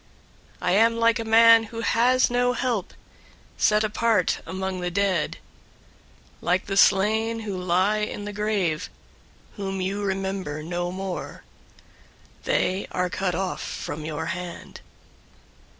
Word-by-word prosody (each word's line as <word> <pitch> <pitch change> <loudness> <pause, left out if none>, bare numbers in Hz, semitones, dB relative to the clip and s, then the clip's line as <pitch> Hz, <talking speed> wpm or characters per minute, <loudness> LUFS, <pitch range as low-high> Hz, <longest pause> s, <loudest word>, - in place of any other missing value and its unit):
I - - +1
am 225 +4 +4
like 230 0 +3
a - - -2
man 225 0 +6
who 230 +1 -7
has 245 +2 +3
no 245 0 +2
help, 240 -7 -2 0.7
088:005 - - -11
set 210 0 +4
apart 215 -3 +1
among 190 0 -3
the 180 0 -2
dead, 185 -3 0 1.0
like 180 +2 +1
the 195 - -3
slain 220 +4 +3
who 205 -3 -4
lie 185 +4 +1
in 210 -1 -4
the 205 - -5
grave, 205 -6 -1 0.7
whom 195 -1 -3
you 195 +2 -2
remember 190 -6 -3
no 175 +2 -3
more. 190 0 -6 1.0
They 190 +2 0
are 180 -1 -1
cut 185 -3 -1
off 190 +1 -3
from 150 +1 -5
your 155 0 -4
hand. 180 -2 -8
195 Hz, 135 wpm, -24 LUFS, 180-220 Hz, 1.0 s, man